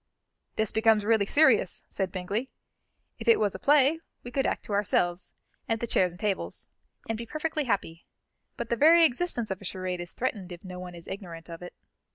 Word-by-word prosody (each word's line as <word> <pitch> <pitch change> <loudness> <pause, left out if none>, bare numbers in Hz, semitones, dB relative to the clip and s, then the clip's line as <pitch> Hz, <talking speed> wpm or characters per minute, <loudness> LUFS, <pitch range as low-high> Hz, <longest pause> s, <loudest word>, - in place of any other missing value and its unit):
"This 220 -1 0
becomes 220 -1 +3
really 220 -2 +3
serious," 310 +7 +4
said 190 -2 -3
Bingley. 200 +8 -3 0.7
"If 225 - -8
it 230 - +6
was 205 -2 +1
a - - -7
play, 290 +2 +4 0.2
we 245 - -8
could 270 +2 +1
act - - -2
to 210 - -5
ourselves, 180 -3 0 0.4
and 225 -1 0
the 235 - -2
chairs 185 -5 +2
and 175 - -15
tables, 205 -2 -3 0.4
and 225 - -1
be 235 - -6
perfectly 310 +2 -2
happy; 180 -7 -2 0.5
but 235 -1 -4
the 235 - +2
very 325 +6 +7
existence 245 - 0
of 190 - -4
a - - -10
charade 185 -1 -3
is 175 - -6
threatened 205 -7 -3
if 175 0 -9
no 180 -1 -7
one 180 -1 -8
is 170 - -11
ignorant 175 -4 -8
of 165 - -8
it. 180 - -9
210 Hz, 205 wpm, -28 LUFS, 180-240 Hz, 0.7 s, very